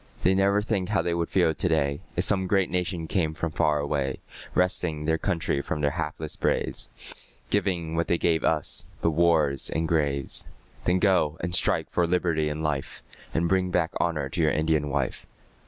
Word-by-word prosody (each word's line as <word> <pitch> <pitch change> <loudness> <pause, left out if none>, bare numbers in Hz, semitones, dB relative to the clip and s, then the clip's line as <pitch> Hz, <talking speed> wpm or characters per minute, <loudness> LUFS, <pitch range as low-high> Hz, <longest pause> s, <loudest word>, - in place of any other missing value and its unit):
They 95 - +4
never 100 +2 +3
think 100 -4 -1
how 100 -2 +1
they 85 - 0
would 85 -1 -1
feel 85 -4 +3
to 90 - -1
day, 70 -3 +1
If - - +1
some 95 -1 +3
great 95 0 +1
nation 90 -2 -1
came 80 -3 0
from 85 0 -3
far 75 -1 +2
away, 70 -2 -1 0.4
Wresting 85 -4 0
their 80 +1 +1
country 85 -7 0
from 75 - -3
their 70 -1 +2
hapless 80 -1 -4
braves, - - -1 0.6
Giving 90 -5 0
what 85 +1 0
they 85 - +2
gave 80 -1 +1
us 75 -3 0 0.2
but 85 - +3
wars 80 -4 +2
and 80 +2 -1
graves. 70 -5 +1 0.4
Then 90 +1 +3
go 90 -5 +2
and 85 +1 -3
strike 90 - +2
for 85 -1 +1
liberty 85 -3 +1
and 75 +1 -4
life, 75 -3 -3 0.3
And 85 +1 +2
bring 95 +1 +1
back 85 -1 +1
honour 75 -5 0
to 85 - -2
your 80 - +4
Indian 75 -1 +1
wife. 70 -3 -2
80 Hz, 190 wpm, -26 LUFS, 75-90 Hz, 0.6 s, They